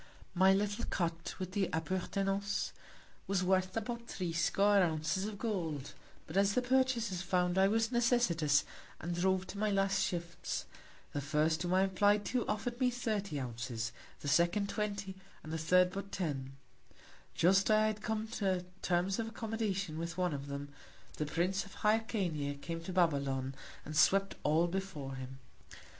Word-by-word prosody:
My 190 Hz, +1 st, +5 dB
little 205 Hz, +3 st, +1 dB
Cot, 165 Hz, -2 st, -2 dB
with 185 Hz, -1 st, -4 dB
the 195 Hz, -1 st, 0 dB
Appurtenances, 195 Hz, +4 st, -1 dB, 0.6 s
were 190 Hz, -2 st, +1 dB
worth 185 Hz, +2 st, +2 dB
about 235 Hz, +1 st, -4 dB
threescore 195 Hz, +3 st, +2 dB
Ounces 165 Hz, +2 st, 0 dB
of 215 Hz, -1 st, -6 dB
Gold: 165 Hz, -, -3 dB, 0.3 s
But 160 Hz, -, -5 dB
as 200 Hz, 0 st, +3 dB
the 250 Hz, -, +2 dB
Purchasers 245 Hz, -7 st, +1 dB
found 180 Hz, -1 st, +1 dB
I 190 Hz, 0 st, +5 dB
was 225 Hz, +3 st, +1 dB
necessitous, 230 Hz, -, +3 dB, 0.4 s
and 175 Hz, +1 st, -3 dB
drove 190 Hz, +2 st, +1 dB
to 200 Hz, +2 st, -7 dB
my 215 Hz, 0 st, +2 dB
last 195 Hz, -1 st, +2 dB
Shifts; 170 Hz, -1 st, -3 dB, 0.5 s
the 145 Hz, -, -1 dB
first 155 Hz, +3 st, +1 dB
whom 180 Hz, +1 st, +1 dB
I 190 Hz, -, +5 dB
apply'd 205 Hz, +2 st, +3 dB
to, 250 Hz, -2 st, +1 dB
offer'd 240 Hz, +3 st, -2 dB
me 255 Hz, -1 st, +4 dB
thirty 210 Hz, -9 st, -2 dB
Ounces; 120 Hz, -2 st, -4 dB, 0.3 s
the -, -, -5 dB
second, 175 Hz, +8 st, +3 dB
twenty; 200 Hz, -3 st, -3 dB, 0.3 s
and 155 Hz, -, -6 dB
the 160 Hz, -, -1 dB
third, 180 Hz, +3 st, +4 dB
but 195 Hz, +1 st, -6 dB
ten: 140 Hz, -7 st, -3 dB, 0.8 s
Just 190 Hz, +5 st, +4 dB
as 215 Hz, -, +6 dB
I 215 Hz, 0 st, +4 dB
had 215 Hz, -1 st, -1 dB
come 220 Hz, 0 st, -2 dB
to 190 Hz, -5 st, -1 dB, 0.2 s
Terms 185 Hz, +3 st, +1 dB
of 225 Hz, -, -1 dB
Accommodation 215 Hz, -7 st, -2 dB
with 170 Hz, +1 st, -4 dB
one 180 Hz, -3 st, +1 dB
of 140 Hz, 0 st, -5 dB
them, 140 Hz, 0 st, -5 dB, 0.5 s
the 150 Hz, -, -1 dB
Prince 180 Hz, +5 st, 0 dB
of 195 Hz, -, -13 dB
Hyrcania 195 Hz, -10 st, 0 dB
came 165 Hz, +2 st, -5 dB
to 185 Hz, -, -4 dB
Babylon, 140 Hz, -7 st, +1 dB, 0.3 s
and 155 Hz, -, -6 dB
swept 195 Hz, +6 st, +4 dB
all 155 Hz, +3 st, +3 dB
before 175 Hz, -7 st, -4 dB
him. 130 Hz, 0 st, -7 dB
185 Hz, 160 wpm, -34 LUFS, 160-205 Hz, 0.8 s, as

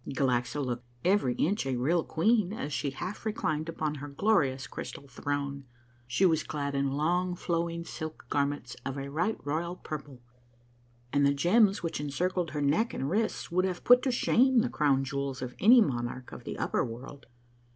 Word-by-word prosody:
Galaxa 130 Hz, 0 st, 0 dB
looked 120 Hz, -1 st, -4 dB, 0.2 s
every 180 Hz, -10 st, +3 dB
inch 190 Hz, -2 st, 0 dB
a 130 Hz, -, 0 dB
real 155 Hz, +7 st, +1 dB
queen 205 Hz, +3 st, +2 dB
as 150 Hz, -9 st, -4 dB
she 135 Hz, +1 st, -1 dB
half 180 Hz, +9 st, -6 dB
reclined 160 Hz, -8 st, -1 dB
upon 155 Hz, -2 st, -2 dB
her 145 Hz, -, -5 dB
glorious 140 Hz, -5 st, +1 dB
crystal 140 Hz, -, -8 dB
throne. 140 Hz, +1 st, -3 dB, 0.4 s
She 125 Hz, +10 st, +2 dB
was 160 Hz, -3 st, +3 dB
clad 140 Hz, -2 st, -3 dB
in 140 Hz, 0 st, +1 dB
long, 175 Hz, +5 st, +1 dB
flowing 170 Hz, -1 st, -2 dB
silk 155 Hz, -1 st, -7 dB
garments 140 Hz, -3 st, -1 dB
of 135 Hz, +1 st, -4 dB
a 140 Hz, 0 st, -5 dB
right 175 Hz, +9 st, 0 dB
royal 165 Hz, +4 st, -2 dB
purple, 145 Hz, -6 st, -7 dB, 0.9 s
and 145 Hz, 0 st, +3 dB
the 140 Hz, 0 st, +4 dB
gems 195 Hz, +7 st, +3 dB
which 165 Hz, -3 st, -2 dB
encircled 175 Hz, +4 st, -1 dB
her 145 Hz, +1 st, -3 dB
neck 165 Hz, +12 st, +1 dB
and 135 Hz, +3 st, -2 dB
wrists 215 Hz, -1 st, -1 dB
would 185 Hz, +2 st, +2 dB
have 185 Hz, -2 st, -3 dB
put 245 Hz, +1 st, +7 dB
to 265 Hz, -, 0 dB
shame 250 Hz, +1 st, +4 dB
the 245 Hz, -, -1 dB
crown 140 Hz, -, +2 dB
jewels 140 Hz, 0 st, -3 dB
of 125 Hz, -1 st, -5 dB
any 235 Hz, +5 st, +8 dB
monarch 125 Hz, -, -2 dB
of -, -, -10 dB
the -, -, -5 dB
upper -, -, 0 dB
world. 125 Hz, +4 st, -8 dB
150 Hz, 180 wpm, -29 LUFS, 140-180 Hz, 0.9 s, any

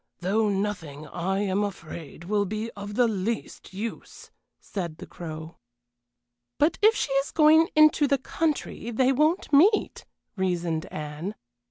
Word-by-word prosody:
Though 210 Hz, +4 st, +1 dB
nothing, 190 Hz, -8 st, -3 dB
I 185 Hz, +6 st, -2 dB
am 200 Hz, 0 st, 0 dB
afraid, 165 Hz, -5 st, -7 dB
will 205 Hz, +3 st, 0 dB
be 215 Hz, +3 st, -4 dB
of 205 Hz, 0 st, -8 dB
the 245 Hz, 0 st, +4 dB
least 220 Hz, +1 st, -3 dB
use," 215 Hz, +4 st, -7 dB, 0.3 s
said 170 Hz, -6 st, -5 dB
the -, -, -9 dB
Crow. 160 Hz, -1 st, -8 dB, 1.0 s
"But 305 Hz, +3 st, +2 dB
if 435 Hz, +2 st, +6 dB
she 285 Hz, -, -1 dB
is 275 Hz, +1 st, +1 dB
going 315 Hz, +1 st, +5 dB
into 305 Hz, -1 st, +6 dB
the 280 Hz, -, +3 dB
country 295 Hz, -3 st, -2 dB
they 255 Hz, +3 st, +2 dB
won't 305 Hz, +4 st, +1 dB
meet," 385 Hz, +10 st, +4 dB, 0.3 s
reasoned 175 Hz, -4 st, -1 dB
Anne. 155 Hz, +7 st, -6 dB
205 Hz, 140 wpm, -26 LUFS, 175-275 Hz, 1.0 s, if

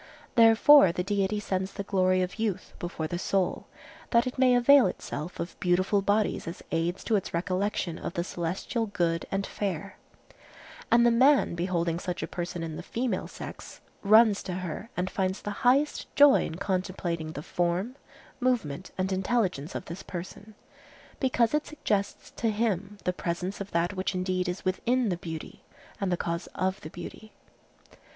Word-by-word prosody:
Therefore 230 Hz, -1 st, +7 dB
the 180 Hz, -, -2 dB
Deity 200 Hz, +1 st, 0 dB
sends 190 Hz, -1 st, -2 dB
the 200 Hz, -, -4 dB
glory 185 Hz, -2 st, +2 dB
of 180 Hz, +4 st, -5 dB
youth 215 Hz, -5 st, -2 dB
before 175 Hz, -2 st, -4 dB
the 175 Hz, +2 st, -3 dB
soul, 190 Hz, 0 st, -1 dB, 0.4 s
that 235 Hz, 0 st, +4 dB
it 255 Hz, 0 st, -4 dB
may 255 Hz, -1 st, +5 dB
avail 250 Hz, -1 st, +6 dB
itself 170 Hz, -2 st, -6 dB
of 170 Hz, -, -5 dB
beautiful 185 Hz, +3 st, +2 dB
bodies 205 Hz, -1 st, 0 dB
as 165 Hz, -, -7 dB
aids 165 Hz, +2 st, -1 dB
to 225 Hz, -, +1 dB
its 190 Hz, -, -4 dB
recollection 185 Hz, -1 st, -1 dB
of -, -, -5 dB
the 170 Hz, -, -1 dB
celestial 185 Hz, +7 st, -3 dB
good 170 Hz, -4 st, -1 dB
and 195 Hz, 0 st, -1 dB
fair; 195 Hz, -1 st, -4 dB, 0.9 s
and 235 Hz, +1 st, +5 dB
the 240 Hz, -, +5 dB
man 265 Hz, +1 st, +4 dB
beholding 170 Hz, -1 st, -1 dB
such 180 Hz, -1 st, -4 dB
a -, -, -3 dB
person 175 Hz, -1 st, -4 dB
in 160 Hz, -1 st, -5 dB
the -, -, -5 dB
female 240 Hz, +1 st, -2 dB
sex -, -, -9 dB, 0.2 s
runs 215 Hz, 0 st, +6 dB
to 185 Hz, -, -5 dB
her 185 Hz, +4 st, -5 dB
and 180 Hz, +1 st, 0 dB
finds 190 Hz, 0 st, -1 dB
the 205 Hz, -, -3 dB
highest 275 Hz, +4 st, +2 dB
joy 285 Hz, -1 st, +7 dB
in 160 Hz, -, -5 dB
contemplating 180 Hz, -4 st, -2 dB
the 145 Hz, -, -6 dB
form, 175 Hz, +10 st, -1 dB, 0.4 s
movement, 200 Hz, -, -1 dB
and 190 Hz, +1 st, -1 dB
intelligence 190 Hz, -, 0 dB
of -, -, -4 dB
this 170 Hz, +4 st, -7 dB
person, 195 Hz, +4 st, -8 dB, 0.6 s
because 245 Hz, -3 st, +2 dB
it 300 Hz, 0 st, 0 dB
suggests 210 Hz, -10 st, -2 dB
to 230 Hz, -, -1 dB
him 205 Hz, -2 st, -1 dB
the 180 Hz, -, 0 dB
presence 180 Hz, +3 st, -3 dB
of 200 Hz, -, -5 dB
that 170 Hz, +2 st, 0 dB
which 185 Hz, 0 st, -2 dB
indeed 185 Hz, 0 st, -1 dB
is 180 Hz, +2 st, -5 dB
within 235 Hz, +6 st, +1 dB
the 175 Hz, -, -1 dB
beauty, 160 Hz, -2 st, -8 dB, 0.4 s
and 195 Hz, -2 st, -1 dB
the 175 Hz, -, +1 dB
cause 170 Hz, 0 st, -3 dB
of 190 Hz, +1 st, -1 dB
the 155 Hz, -, -8 dB
beauty. 175 Hz, +6 st, -9 dB
190 Hz, 170 wpm, -28 LUFS, 175-220 Hz, 0.9 s, Therefore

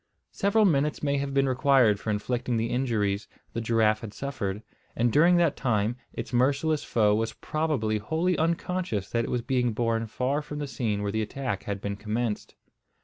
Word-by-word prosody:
Several 205 Hz, +2 st, +2 dB
minutes 150 Hz, -4 st, +1 dB
may 140 Hz, -1 st, +1 dB
have 140 Hz, 0 st, -2 dB
been 135 Hz, 0 st, +2 dB
required 130 Hz, -5 st, +4 dB
for 110 Hz, -, -5 dB
inflicting 120 Hz, +3 st, -1 dB
the 115 Hz, +1 st, -1 dB
injuries 110 Hz, -5 st, 0 dB, 0.3 s
the 115 Hz, -, -2 dB
giraffe 110 Hz, -1 st, +2 dB
had 110 Hz, -2 st, -8 dB
suffered, 105 Hz, -7 st, -4 dB, 0.3 s
and 120 Hz, 0 st, +1 dB
during 170 Hz, +4 st, +6 dB
that 170 Hz, -4 st, +3 dB
time 110 Hz, -2 st, 0 dB, 0.2 s
its -, -, -6 dB
merciless 140 Hz, +5 st, +2 dB
foe 105 Hz, -3 st, +2 dB
was 110 Hz, +1 st, 0 dB
probably 140 Hz, -9 st, -1 dB
wholly 160 Hz, -, 0 dB
unconscious 165 Hz, -, -1 dB
that 115 Hz, 0 st, +1 dB
it -, -, -5 dB
was 120 Hz, -1 st, -1 dB
being 125 Hz, -3 st, +1 dB
borne 115 Hz, 0 st, 0 dB
far 130 Hz, +6 st, -1 dB
from 150 Hz, 0 st, -7 dB
the 145 Hz, -, -2 dB
scene 110 Hz, -7 st, -2 dB
where 100 Hz, -, -1 dB
the 110 Hz, +1 st, 0 dB
attack 110 Hz, -2 st, -3 dB
had 100 Hz, -1 st, -3 dB
been 100 Hz, 0 st, -3 dB
commenced. 110 Hz, +1 st, -3 dB
120 Hz, 185 wpm, -27 LUFS, 110-140 Hz, 0.3 s, during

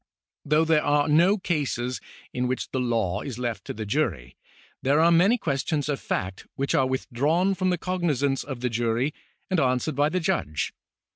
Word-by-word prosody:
Though 150 Hz, +2 st, +3 dB
there 160 Hz, -1 st, +3 dB
are 145 Hz, 0 st, +2 dB
no 170 Hz, +7 st, +4 dB
cases 135 Hz, -9 st, -2 dB, 0.3 s
in 125 Hz, 0 st, -1 dB
which 130 Hz, +1 st, -3 dB
the 130 Hz, -, -1 dB
law 115 Hz, -6 st, 0 dB
is 130 Hz, -5 st, -6 dB
left 120 Hz, -2 st, -3 dB
to -, -, -5 dB
the 110 Hz, 0 st, -5 dB
jury, 100 Hz, -, -1 dB, 0.5 s
there 140 Hz, +3 st, +3 dB
are 165 Hz, +1 st, +5 dB
many 190 Hz, +8 st, +5 dB
questions 145 Hz, -, -1 dB
of 145 Hz, -2 st, -1 dB
fact 95 Hz, 0 st, -4 dB
which 140 Hz, +1 st, -1 dB
are 130 Hz, -, +3 dB
withdrawn 145 Hz, +9 st, +1 dB
from 185 Hz, -1 st, 0 dB
the 180 Hz, -, +1 dB
cognisance 150 Hz, -7 st, 0 dB
of 130 Hz, -3 st, -7 dB
the 125 Hz, -, 0 dB
jury 120 Hz, +5 st, 0 dB, 0.4 s
and 185 Hz, -, +3 dB
answered 130 Hz, +2 st, +1 dB
by 145 Hz, +2 st, +3 dB
the 185 Hz, -, 0 dB
judge. 160 Hz, -, -1 dB
140 Hz, 185 wpm, -25 LUFS, 125-160 Hz, 0.5 s, are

